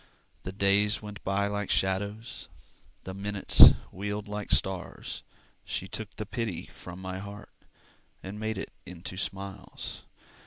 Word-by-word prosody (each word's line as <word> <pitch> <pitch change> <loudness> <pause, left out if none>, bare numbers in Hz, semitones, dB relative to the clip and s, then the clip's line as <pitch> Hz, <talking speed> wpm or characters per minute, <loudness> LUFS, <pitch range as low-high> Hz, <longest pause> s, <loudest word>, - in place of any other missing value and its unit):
The 95 - -4
days 100 +2 +3
went 105 -1 -8
by 95 +1 +2
like 100 -1 -1
shadows, 100 +4 0 0.5
The 95 - -5
minutes 100 +1 +8 0.2
wheeled 105 +2 -3
like 105 0 -4
stars. 95 -2 0 0.4
She 95 - -2
took 110 +1 -5
the 110 - -4
pity 110 -4 -2
from 90 0 -9
my 95 0 -4
heart, 100 +1 -8 0.7
And 100 +3 -6
made 110 -1 -1
it - - -5
into 90 +1 -7
smiles. 95 0 -4
100 Hz, 130 wpm, -30 LUFS, 95-105 Hz, 0.7 s, minutes